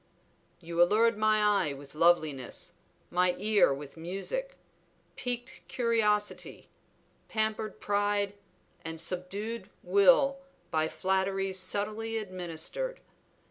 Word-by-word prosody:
You 170 0 -1
allured 220 +6 +4
my 215 0 +3 0.3
eye 145 - -3
with 140 0 -12
loveliness, 155 -5 +1 0.4
my 180 0 +2
ear 210 -7 +4
with 140 +2 -6
music; 195 - -4 0.6
piqued 245 +1 -3
curiosity, 220 -4 0 0.6
pampered 220 0 -1
pride, 205 0 0 0.5
and 165 0 -5
subdued 190 +5 -2
will 265 +9 +4 0.3
by 155 0 +1
flatteries 190 +1 0
subtly 215 +4 -1
administered. 185 - -3
200 Hz, 95 wpm, -30 LUFS, 175-220 Hz, 0.6 s, allured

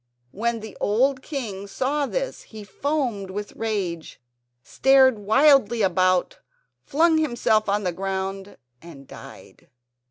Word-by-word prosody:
When 230 +2 -2
the 220 - -10
old 260 +6 +1
king 220 -10 -6
saw 275 +7 -1
this - - -4
he 215 -2 -12
foamed 235 -2 -3
with 205 +2 -6
rage, 195 -7 -4 0.4
stared 265 - +4
wildly 235 0 +3
about, 185 -1 +1 0.4
flung 320 +2 +2
himself 235 -7 +1
on 205 +1 0
the 180 - -1
ground 195 +2 -5 0.2
and 145 -5 -13
died. - - -14
215 Hz, 120 wpm, -23 LUFS, 195-270 Hz, 0.4 s, stared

